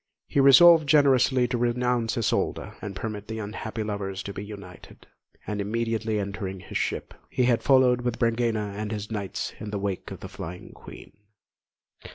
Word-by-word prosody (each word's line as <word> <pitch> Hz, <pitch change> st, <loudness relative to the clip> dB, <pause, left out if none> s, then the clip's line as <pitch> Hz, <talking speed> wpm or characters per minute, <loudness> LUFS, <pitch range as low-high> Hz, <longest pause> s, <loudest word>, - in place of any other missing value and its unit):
He -, -, -1 dB
resolved 150 Hz, +3 st, +7 dB
generously 135 Hz, -4 st, +4 dB
to 125 Hz, -2 st, -1 dB
renounce 120 Hz, -1 st, 0 dB
Isolda, 115 Hz, -, -1 dB
and 100 Hz, -2 st, -6 dB
permit 105 Hz, +1 st, -5 dB
the 110 Hz, 0 st, -5 dB
unhappy 110 Hz, +1 st, -5 dB
lovers 100 Hz, -2 st, -4 dB
to 100 Hz, -, -6 dB
be 100 Hz, -, -6 dB
united; 100 Hz, -4 st, -11 dB, 0.4 s
and 105 Hz, -1 st, -3 dB
immediately 110 Hz, +1 st, -1 dB
entering 100 Hz, -1 st, -4 dB
his -, -, -5 dB
ship, -, -, -3 dB, 0.2 s
he 125 Hz, -, 0 dB
had 120 Hz, -2 st, +3 dB
followed 130 Hz, -2 st, +4 dB
with 120 Hz, -1 st, -2 dB
Brangæna 115 Hz, -3 st, 0 dB
and 105 Hz, +1 st, -4 dB
his 105 Hz, 0 st, -5 dB
knights 100 Hz, -3 st, -4 dB
in 105 Hz, -, -6 dB
the 105 Hz, -, -3 dB
wake 100 Hz, -2 st, -3 dB
of -, -, -9 dB
the -, -, -6 dB
flying 90 Hz, +2 st, -8 dB
Queen. -, -, -13 dB
110 Hz, 170 wpm, -26 LUFS, 100-125 Hz, 0.4 s, resolved